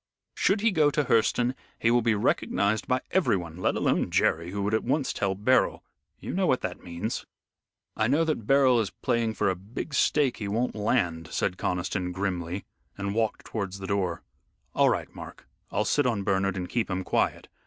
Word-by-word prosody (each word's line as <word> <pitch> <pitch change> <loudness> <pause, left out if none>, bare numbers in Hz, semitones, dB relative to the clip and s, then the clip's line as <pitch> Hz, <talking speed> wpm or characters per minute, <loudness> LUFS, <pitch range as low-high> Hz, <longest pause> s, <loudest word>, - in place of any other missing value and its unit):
Should 200 +1 +2
he 230 +1 +3
go 155 -5 +4
to 150 +1 +1
Hurseton 120 +1 +2 0.2
he 115 - +2
will 120 0 +4
be 115 -1 +2
recognized 100 +1 +1
by 130 0 +1
everyone, 90 - +1
let 90 - 0
alone - - +1
Jerry, 85 +2 +1
who 100 +2 -3
would 105 +2 -1
at 110 - +1
once 135 +2 0
tell 95 -1 -1
Beryl. 125 +6 +2 0.4
You - - -6
know 185 0 +1
what 130 - +2
that 90 -1 -5
means." 90 +6 -4 0.7
"I 110 - +1
know 145 +6 +3
that 150 -10 -2
Beryl 135 -3 +5
is 105 -4 0
playing 115 -2 -1
for - - +1
a 95 - +2
big 105 - -7
stake 140 -1 +2
he 105 - -4
won't 115 +5 0
land," 90 -7 0
said 90 - 0
Conniston, 90 0 -2
grimly, 90 -1 -3 0.3
and 100 0 -2
walked 110 0 -1
towards 100 -3 -4
the 95 - -7
door. 95 -3 -1 0.5
"All - - +4
right, - - -2
Mark, - - -11 0.2
I'll 105 - 0
sit 145 -3 +2
on 110 -5 0
Bernard 95 0 +1
and 90 -1 -3
keep 115 +5 -1
him 95 0 -2
quiet. - - 0
105 Hz, 195 wpm, -27 LUFS, 95-125 Hz, 0.7 s, Beryl